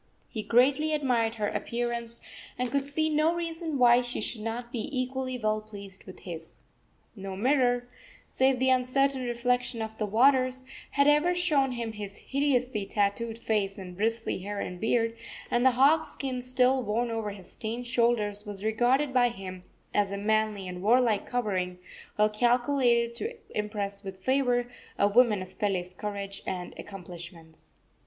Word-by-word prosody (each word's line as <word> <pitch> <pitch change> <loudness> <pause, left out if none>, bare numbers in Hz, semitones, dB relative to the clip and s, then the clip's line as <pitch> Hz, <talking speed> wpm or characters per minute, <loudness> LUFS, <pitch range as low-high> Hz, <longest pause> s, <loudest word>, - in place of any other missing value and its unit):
He 220 - -4
greatly 270 +8 +3
admired 240 -6 +1
her 210 -2 -1
appearance, 235 -1 -3
and 250 -1 -1
could 280 +1 0
see 310 +2 0
no 310 +2 +2
reason 330 -2 -3
why 245 -1 +6
she 245 0 -4
should 215 +1 -2
not 235 +2 -4
be 235 -3 -3
equally 255 0 -2
well 215 -2 0
pleased 200 -3 -11
with 185 - -12
his. 165 -2 -9 0.5
No 195 -2 -6
mirror, 245 +2 +2 0.4
save 265 0 +2
the 260 +1 +3
uncertain 260 +1 +2
reflection 245 0 0
of 220 0 -4
the 215 - 0
waters, 255 +3 +3 0.3
had 280 0 +4
ever 300 +5 +4
shown 295 -7 +2
him 235 -2 -3
his 205 -2 -7
hideously 255 -6 0
tattooed 220 +3 0
face 210 -3 -1
and 180 -2 -8
bristly 225 +1 -1
hair 200 +2 -5
and 180 -2 -5
beard, 230 0 +1 0.4
and 240 0 +2
the 260 - +7
hog 290 +5 +5
skin 260 -2 -4
still 255 +1 +2
worn 235 +2 -1
over 225 -2 -2
his 200 -3 -10
stained 230 +3 -4
shoulders 235 -4 +1
was 205 -2 -7
regarded 245 +6 +2
by 245 -1 +4
him 185 -5 -8 0.3
as 205 -1 +2
a 200 - -3
manly 215 -1 0
and 180 0 -6
warlike 225 0 +3
covering, 190 -7 -1 0.4
well 210 0 +5
calculated 240 +1 +2
to 450 - -4 0.2
impress 205 -1 -2
with 195 -1 -7
favor 250 -2 +2 0.3
a 200 - +4
woman 210 -2 +4
of 185 - -15
Pele's 185 -3 -1
courage 200 0 -5
and 180 -1 -4
accomplishments. 170 -4 -11
235 Hz, 160 wpm, -28 LUFS, 205-255 Hz, 0.5 s, the